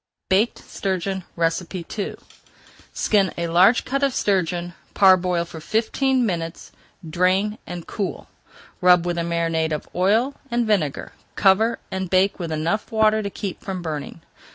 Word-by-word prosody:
BAKED 205 +5 +2
STURGEON 190 0 -2 0.5
II 190 +4 -5 0.8
Skin 200 -4 +2
a 170 0 -1
large 185 +8 +5
cut 275 +2 -1
of 275 -2 +1
sturgeon, 175 -3 0 0.2
parboil 180 -3 +4
for 165 -1 -10
fifteen 245 - +1
minutes, 165 -4 -4 0.4
drain, 185 +6 +1
and 175 -1 -6
cool. 200 -3 -4 0.5
Rub 180 -1 +5
with 175 -1 -1
a - - 0
marinade 165 -1 0
of 155 - -3
oil 220 +9 +2 0.2
and 240 -1 0
vinegar, 185 -10 0 0.2
cover, 215 +4 +3
and 190 -1 -3
bake 190 +2 +2
with 170 -2 -4
enough 160 +7 -1
water 220 -1 +3
to 200 - -3
keep 200 -2 -6
from 185 -2 -5
burning. 155 0 -5
185 Hz, 140 wpm, -22 LUFS, 170-210 Hz, 0.8 s, large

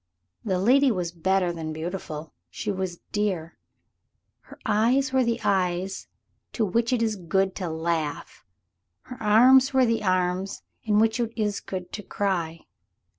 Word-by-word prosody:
The 190 -4 0
lady 260 +8 +4
was 180 -7 -1
better 180 +1 +1
than 160 -2 -5
beautiful, 160 -2 -6 0.2
she 205 - -4
was 185 -3 -4
dear. 190 -6 -2 0.8
Her - - -15
eyes 245 +6 +2
were 260 -1 +4
the 235 0 0
eyes 185 0 0 0.5
to 225 - +1
which 230 +5 0
it 245 -2 +2
is 220 -1 0
good 190 +1 0
to 180 -3 -3
laugh 160 -2 -3 0.6
her 250 -1 -11
arms 255 +6 +6
were 260 -1 +5
the 230 -1 +1
arms 185 0 0 0.2
in 210 -2 +1
which 225 +2 +3
it 235 -2 -1
is 210 -2 0
good 185 -2 -6
to 210 - -4
cry. 175 -6 -2
195 Hz, 150 wpm, -25 LUFS, 175-225 Hz, 0.8 s, arms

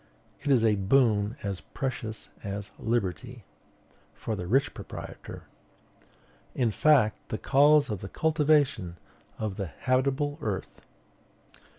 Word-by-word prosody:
"It 145 - -3
is 125 -5 +4
a 110 - +4
boon 105 +1 +2
as 100 -2 -3
precious 120 -5 -5
as 100 +1 -5
liberty." 120 +2 -2 0.7
For 110 - -3
the 90 -3 -5
rich 135 +7 +2
proprietor. - - -9 1.1
"In 120 -4 +1
fact, 130 -4 +3
the 110 - -2
cause 145 +3 +5
of 105 - -4
the 95 - -6
cultivation 145 - +1 0.4
of 105 -3 -3
the 100 -3 -3
habitable 135 - 0
earth." 105 -6 -4
115 Hz, 115 wpm, -28 LUFS, 100-140 Hz, 1.1 s, cause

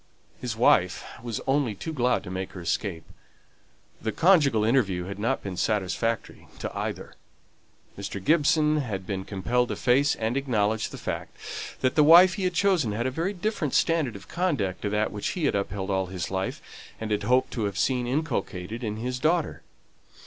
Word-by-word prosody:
His 120 -3 -3
wife 90 -6 +3 0.2
was 115 -2 -4
only 135 -5 +1
too 160 +11 -5
glad 125 -6 +1
to 90 - -7
make 95 0 -4
her 95 - -7
escape. 85 0 -2 1.0
The 110 - -1
conjugal 150 - +4
interview 105 -7 +2
had 95 +2 -7
not 120 +6 0
been 95 -2 -5
satisfactory 110 +3 -1
to - - -5
either. - - -4 0.8
Mr. 100 0 -5
Gibson 155 - +3
had 105 -10 -3
been 95 0 -4
compelled 120 +5 0
to - - -2
face 135 +4 +3
and 115 +2 -2
acknowledge 110 -5 0
the - - -9
fact, - - -5 0.4
that 130 -1 +2
the 150 - +5
wife 175 +4 +8
he 190 +1 -2
had 180 -1 0
chosen 170 - +2
had 115 +3 -2
a 130 - 0
very 165 +8 -1
different 185 -6 -2
standard 160 -9 +2
of 100 0 -11
conduct 145 - -1
from 105 - -1
that 105 +1 0
which 105 - -3
he 165 - 0
had - - +2
upheld 100 -1 -2
all 95 -1 0
his 90 -1 -5
life, 95 0 -3 0.4
and 110 -1 -4
had 105 0 +1
hoped 125 +5 +2
to 115 -4 -2
have 100 -1 -3
seen 125 0 +1
inculcated 120 - -2
in 105 -1 -3
his 125 +2 -3
daughter. 160 +3 +1
115 Hz, 185 wpm, -26 LUFS, 100-145 Hz, 1.0 s, wife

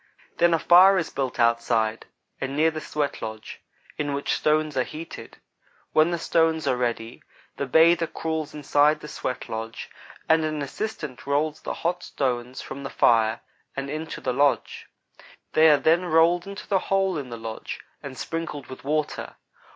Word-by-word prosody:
Then 170 0 +4
a - - +2
fire 185 +4 +7
is 165 - -1
built 130 -2 -3
outside 115 -1 +1 0.3
and 135 +1 -3
near 160 +1 +4
the 155 0 -5
sweatlodge 110 -7 -4 0.4
in 145 -1 -1
which 140 - -1
stones 155 -1 +1
are 130 - +2
heated. 160 +5 -9 0.6
When 155 +2 +5
the 170 - -1
stones 160 -1 +1
are - - +3
ready, 120 -1 -3 0.4
the 140 - -2
bather 165 +4 +5
crawls 160 -2 -4
inside 150 +1 +3
the - - -8
sweat 130 -4 -4
lodge, 115 0 -6 0.4
and 160 0 +4
an 155 -2 -2
assistant 150 - -5
rolls 150 +2 0
the - - -4
hot 175 +1 -2
stones 125 -4 -3
from 140 - -7
the 135 - -5
fire, 110 -1 +3 0.4
and 140 0 -3
into 155 +1 -5
the 130 - -1
lodge. 140 +1 +1 0.7
They 160 +1 +6
are 150 - +6
then 165 +5 +3
rolled 170 +2 +3
into 200 0 -8
the 195 - +2
hole 195 -1 +2
in 140 -5 -5
the 120 - -6
lodge 115 -1 -6 0.2
and 130 - -8
sprinkled 165 -4 -4
with 130 - -9
water. 150 +2 -2
150 Hz, 165 wpm, -25 LUFS, 130-165 Hz, 0.7 s, fire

